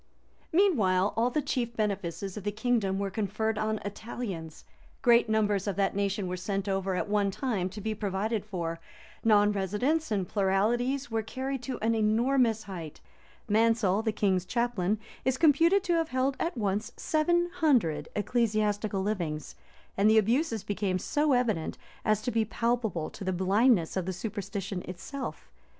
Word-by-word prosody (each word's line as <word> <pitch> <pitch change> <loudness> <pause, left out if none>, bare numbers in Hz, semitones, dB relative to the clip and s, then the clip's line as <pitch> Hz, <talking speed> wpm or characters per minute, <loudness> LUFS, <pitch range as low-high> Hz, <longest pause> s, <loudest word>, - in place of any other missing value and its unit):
Meanwhile 210 - +3
all 235 +2 +2
the 295 +4 -1
chief 235 -3 -2
benefices 195 -3 -2
of 210 - -6
the 205 - -1
kingdom 215 -3 0
were 200 0 -2
conferred 215 +2 -1
on 215 0 0
Italians; 200 -6 -6 0.4
great 235 -1 +5
numbers 210 -2 +1
of 200 - -1
that 195 -1 +1
nation 200 -1 -1
were 180 - -2
sent 195 +2 -3
over 195 -1 0
at 180 - -1
one 205 -1 +2
time 195 -4 -2
to 205 +3 -8
be 215 +1 -2
provided 210 +1 -2
for; 170 -5 -4 0.4
non 210 -2 +5
residence 210 - 0
and 195 -4 -1
pluralities 235 +7 +1
were 225 0 +1
carried 260 +4 -4
to 255 -1 -4
an 225 +1 +3
enormous 225 +1 +2
height; 170 -6 -8 0.5
Mansel, 220 -2 +3
the 225 -1 0
king's 195 -4 +1
chaplain, 220 -4 0 0.3
is 260 +1 +1
computed 335 +6 +4
to 350 - +1
have 330 -1 +1
held 260 +1 0
at 335 -5 -2
once 205 0 -1
seven 345 +3 +1
hundred 215 - +2
ecclesiastical 210 -2 0
livings; 170 -7 -3 0.4
and 200 +2 +4
the 220 - +5
abuses 225 - +2
became 200 -2 -1
so 295 - +1
evident, 225 -10 0 0.3
as 215 0 +1
to 250 - -1
be 225 -1 +2
palpable 220 -6 -1
to 205 - -8
the 190 - 0
blindness 190 +1 +3
of 185 -1 -2
superstition 195 -1 -4
itself. 260 +10 -7
215 Hz, 160 wpm, -29 LUFS, 195-240 Hz, 0.5 s, great